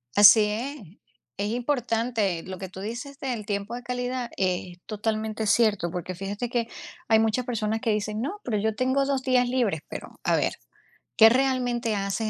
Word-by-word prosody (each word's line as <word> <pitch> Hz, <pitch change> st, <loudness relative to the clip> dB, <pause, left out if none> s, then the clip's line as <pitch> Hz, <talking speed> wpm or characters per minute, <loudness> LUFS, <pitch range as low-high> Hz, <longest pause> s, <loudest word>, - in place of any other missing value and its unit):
Así 210 Hz, +1 st, +9 dB, 0.9 s
es, 200 Hz, +1 st, -1 dB
importante, 230 Hz, -, 0 dB
lo 185 Hz, 0 st, -7 dB
que 190 Hz, -, -6 dB
tú 190 Hz, +1 st, -9 dB
dices 245 Hz, +6 st, -6 dB
del 240 Hz, -6 st, -3 dB
tiempo 205 Hz, +1 st, -3 dB
de 245 Hz, -, -6 dB
calidad 250 Hz, 0 st, -3 dB
es 180 Hz, -1 st, -1 dB
totalmente 215 Hz, 0 st, -2 dB
cierto, 205 Hz, -5 st, +3 dB
porque 180 Hz, +1 st, -5 dB
fíjate 200 Hz, +5 st, -4 dB
que 235 Hz, -2 st, 0 dB, 0.4 s
hay 220 Hz, -1 st, +5 dB
muchas 225 Hz, +3 st, +1 dB
personas 220 Hz, -2 st, -1 dB
que 230 Hz, -3 st, +1 dB
dicen: 210 Hz, +1 st, -1 dB
"No, 395 Hz, +11 st, -4 dB
pero 215 Hz, -4 st, -1 dB
yo 220 Hz, +1 st, 0 dB
tengo 260 Hz, +3 st, +1 dB
2 270 Hz, -2 st, 0 dB
días 250 Hz, -2 st, +3 dB
libres, 235 Hz, -, 0 dB
pero -, -, -9 dB
a -, -, +3 dB
ver, -, -, 0 dB, 0.6 s
¿qué 225 Hz, 0 st, +9 dB
realmente 245 Hz, -3 st, +1 dB
haces 200 Hz, +2 st, -1 dB
225 Hz, 170 wpm, -26 LUFS, 205-245 Hz, 0.9 s, Así